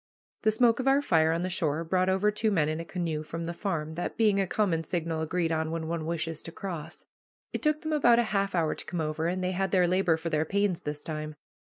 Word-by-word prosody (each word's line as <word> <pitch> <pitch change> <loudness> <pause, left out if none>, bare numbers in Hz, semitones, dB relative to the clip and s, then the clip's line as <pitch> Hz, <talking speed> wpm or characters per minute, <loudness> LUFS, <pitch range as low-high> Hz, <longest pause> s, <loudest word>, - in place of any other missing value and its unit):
The 220 - +3
smoke 230 +2 +4
of 260 - -1
our 275 +1 +4
fire 160 - +3
on 165 +2 0
the - - 0
shore 165 -3 0
brought 185 +2 +1
over 190 +3 +2
two 215 +1 0
men 165 -8 +2
in 155 +1 -2
a - - -3
canoe 165 -4 -2
from 165 +2 -5
the 170 - -3
farm, 165 -5 -3
that 175 +2 -4
being 210 -3 +3
a 190 - -1
common 175 -5 +1
signal 165 -2 -2
agreed 165 +1 0
on 160 0 0
when 160 0 -3
one 165 -1 -3
wishes 165 -1 -2
to 165 - -8
cross. 170 -3 -6 0.5
It - - -2
took 305 -1 +1
them 315 0 -2
about 240 -6 +5
half 200 -4 +1
an 170 - +3
hour 155 - 0
to - - -7
come 175 - -4
over, 155 +1 -1
and 185 +1 -1
they 185 - 0
had 190 +1 0
their 180 -1 +4
labor 180 -2 +2
for 165 +1 -4
their 155 -1 +2
pains 195 +1 0
this 150 0 -5
time. 155 -1 -5
170 Hz, 255 wpm, -28 LUFS, 160-195 Hz, 0.5 s, about